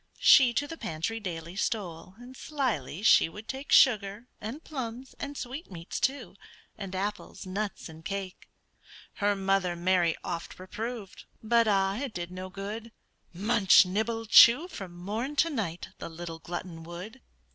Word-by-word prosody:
She 260 -4 +7
to 290 - +1
the 325 +2 -8
pantry 165 +8 -3
daily 170 -3 -6
stole, 185 -4 -3
And 245 +2 -12
slyly 230 - -3
she 215 - +6
would 210 +6 -11
take 270 +2 -6
Sugar, 210 -2 +4 0.2
and 240 +10 -6
plums, 255 -3 -6
and 285 0 -5
sweetmeats, 245 - -6
too, 260 -8 -1 0.4
And 195 -3 -6
apples, 205 +2 -4
nuts, 200 +2 -4
and 160 0 -12
cake. 195 0 -6 0.7
Her 205 0 +2
mother 195 -2 +1
Mary 175 -1 +2
oft 170 - -5
reproved, 215 +2 -6 0.2
But, 230 +1 +3
ah! 195 -1 +2
it 265 -2 -4
did 175 0 -4
no 185 +1 -6
good; 210 +4 -6 0.4
Munch, 200 +1 +5
nibble, 220 +4 -2
chew, 240 +8 +8
from 190 - -8
morn 220 +10 -4
to 330 +3 +3
night, 190 - -3
The - - -6
little 165 0 -7
glutton 175 0 -6
would. 175 +6 -9
200 Hz, 150 wpm, -29 LUFS, 180-235 Hz, 0.7 s, chew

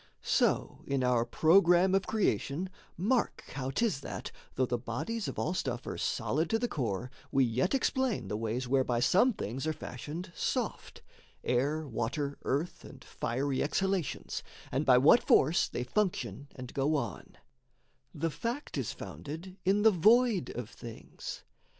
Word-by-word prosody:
So - - +1
in 135 -2 0
our 125 -2 +3
programme 175 +5 +5
of 195 -1 +2
creation, 180 - 0 0.3
mark 235 +8 +1
How 135 -1 -3
'tis 205 0 0
that, - - -6 0.2
though 130 - +2
the 120 -1 -1
bodies 190 - -3
of - - -5
all - - 0
stuff 125 -9 -2
Are - - -4
solid 160 +4 0
to 225 - +3
the 245 +2 -1
core, 125 - -2 0.2
we 135 - +4
yet 125 - +1
explain 260 - 0
The 105 - -2
ways 115 +3 -2
whereby 130 -2 +2
some 195 - +4
things 135 - -4
are 155 - +1
fashioned 155 - -7
soft - - -3 0.4
Air, 145 +5 0
water, 140 +4 -2
earth, 145 +6 -2
and - - -12
fiery 130 +3 -2
exhalations 190 +1 -1 0.3
And 140 +3 -1
by 125 -1 +7
what 145 - +7
force 155 +6 +4
they 125 - -3
function 135 - -1
and 125 -1 -8
go 140 +3 +1
on: 145 - -4 0.7
The 165 +2 -2
fact 240 - -3
is - - -2
founded 165 +6 -8
in 200 +2 +3
the 220 - +7
void 215 - +4
of 120 -1 -5
things. 115 -2 -8
145 Hz, 155 wpm, -31 LUFS, 125-190 Hz, 0.7 s, by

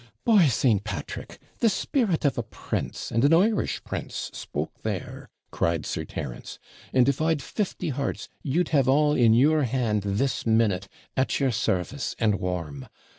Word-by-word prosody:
'By 210 -8 +6
St. 110 -4 +2
Patrick! 105 -2 -6 0.2
the 230 - +4
spirit 205 - 0
of 140 -4 +2
a - - -1
prince, - - -5
and 115 0 +1
an 145 +4 +6
Irish 210 +5 +1
prince, - - -5
spoke - - -5
there,' - - -5 0.2
cried 85 -2 0
Sir - - -3
Terence; - - -6 0.3
'and 130 -1 +4
if 140 +1 +1
I'd 160 -1 +2
fifty 180 +1 -3
hearts, 140 0 -3
you'd 155 +5 0
have 135 -4 +3
all 150 +2 +4
in 115 -5 +5
your 150 +5 +4
hand 120 -5 0
this 115 +6 0
minute, 110 -4 +2 0.3
at 130 - +1
your 135 -2 +2
service, 110 +5 -1
and 105 -4 +1
warm. 85 -7 -4
130 Hz, 160 wpm, -26 LUFS, 105-150 Hz, 0.3 s, By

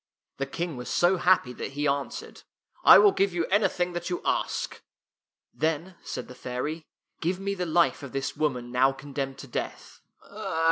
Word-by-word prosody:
The 135 - -2
King 165 0 -4
was 125 - -6
so 180 +2 +3
happy 175 -8 +3
that 135 - -6
he 145 +1 0
answered, 140 0 -3 0.2
" - - -58
I - - +10
will 410 - +7
give 195 - +1
you 170 -1 +1
anything 180 -3 +2
that 175 +1 -4
you 175 - -1
ask." - - -1 0.4
" - - -67 0.3
Then," 160 +4 -1
said - - -5
the - - -10
fairy, 130 +6 -4
" - - -47
give 180 +3 0
me 200 +1 -2
the 180 -2 -3
life 170 0 +3
of 140 -3 -8
this 135 -1 -3
woman 125 -5 -1
now 130 +2 +4
condemned 135 0 -5
to 140 - -9
death." 120 - -6
155 Hz, 190 wpm, -27 LUFS, 135-175 Hz, 0.4 s, I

